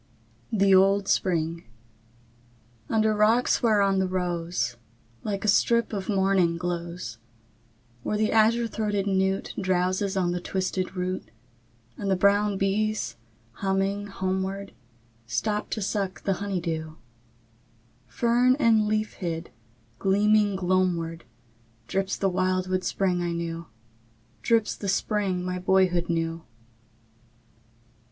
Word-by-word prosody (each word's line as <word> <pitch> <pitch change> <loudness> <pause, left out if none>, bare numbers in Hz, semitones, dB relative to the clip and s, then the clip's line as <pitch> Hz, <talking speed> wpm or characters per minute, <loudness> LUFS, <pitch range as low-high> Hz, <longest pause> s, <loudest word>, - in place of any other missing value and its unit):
THE 195 -2 +4
OLD 195 +1 +4
SPRING 165 -2 0 1.3
I. - - -1
Under 220 0 +3
rocks 220 +4 +3
whereon 200 -4 +3
the 190 - +1
rose, 175 -9 -2 0.5
Like 200 -1 -3
a - - 0
strip 235 +3 +3
of 195 -1 -4
morning, 190 -4 +2
glows; 170 -7 -4 0.8
Where 210 - -2
the 215 0 +1
azure 225 +2 +4
throated 210 -3 -1
newt 190 -1 0
Drowses 185 +1 0
on 175 -1 +1
the 175 0 -2
twisted 185 0 -2
root; 185 0 -3 0.7
And 200 - -3
the 190 - +3
brown 200 +2 +3
bees, 195 - 0 0.4
humming 195 - -1
homeward, 190 0 -3 0.5
Stop 210 - -1
to 215 - -2
suck 195 -1 -2
the 195 - +1
honey 200 -2 -1
dew; 160 -2 -4 1.1
Fern 240 - +3
and 230 -6 +3
leaf 215 0 -1
hid, 165 -3 -5 0.5
gleaming 205 +1 +3
gloamward, 175 -3 0 0.6
Drips 195 +8 -1
the 195 - +1
wildwood 185 0 0
spring 180 -2 0
I 175 -1 -1
knew, 170 -1 -4 0.7
Drips 230 -2 +2
the 200 - -4
spring 195 -2 0
my 180 0 -2
boyhood 180 -2 +2
knew. 165 0 -1
190 Hz, 115 wpm, -26 LUFS, 180-205 Hz, 1.3 s, THE